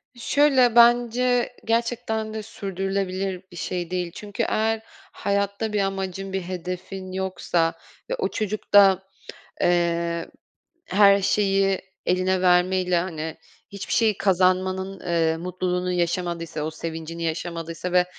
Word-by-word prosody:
Şöyle, 260 -1 +3
bence 240 +1 +4
gerçekten 225 -1 -1
de 215 -1 -4
sürdürülebilir 195 -2 -3
bir 175 - -12
şey 175 0 -4
değil. 180 -2 -2
Çünkü 205 -1 -4
eğer 220 0 0 0.3
hayatta 200 +2 -1
bir 210 - +1
amacın, 195 0 -3
bir 190 - -1
hedefin 185 +1 -6
yoksa 185 -3 0 0.4
ve - - 0
o 475 - -1
çocuk 215 -1 -4
da, 195 -2 +7 0.6
eee, 170 -1 +1 0.6
her 200 0 +5
şeyi 195 -1 +2 0.3
eline 185 +1 +1
vermeyle, 180 0 +3
hani, 160 -3 -4 0.4
hiçbir 200 -1 -6
şey 220 -4 +2
kazanmanın, 185 0 +1
eee, 165 -2 +1
mutluluğunu 180 +1 -2
yaşamadıysa, 170 -2 -2
o 155 - -2
sevincini 165 +1 -6
yaşamadıysa 165 +1 -4
ve 180 0 +5
185 Hz, 120 wpm, -24 LUFS, 175-205 Hz, 0.6 s, da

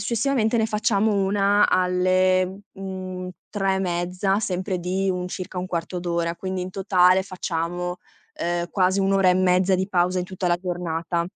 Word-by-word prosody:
successivamente 235 +1 +1
ne 220 - +2
facciamo 215 -1 +1
1 200 +1 +3
alle, 185 +1 +2
mhmm, 185 -1 -6 0.2
3 195 -2 0
e 190 - -1
mezza, 180 +2 -1
sempre 185 -2 -2
di 190 +2 -1
un 180 0 -3
circa 185 0 -6
1/4 180 0 -3
d'ora. 170 -1 -1
Quindi 185 0 -4
in 185 - -5
totale 185 -1 +3
facciamo, 180 -1 -3 0.4
ehm, 175 0 -2
quasi 190 0 +2
1 195 0 +2
ora 195 -1 +4
e 180 - +5
mezza 185 0 +3
di 185 +1 0
pausa 180 -1 +1
in 180 - -1
tutta 185 0 -4
la 175 0 +3
giornata. 170 -1 -2
185 Hz, 165 wpm, -23 LUFS, 180-195 Hz, 0.4 s, e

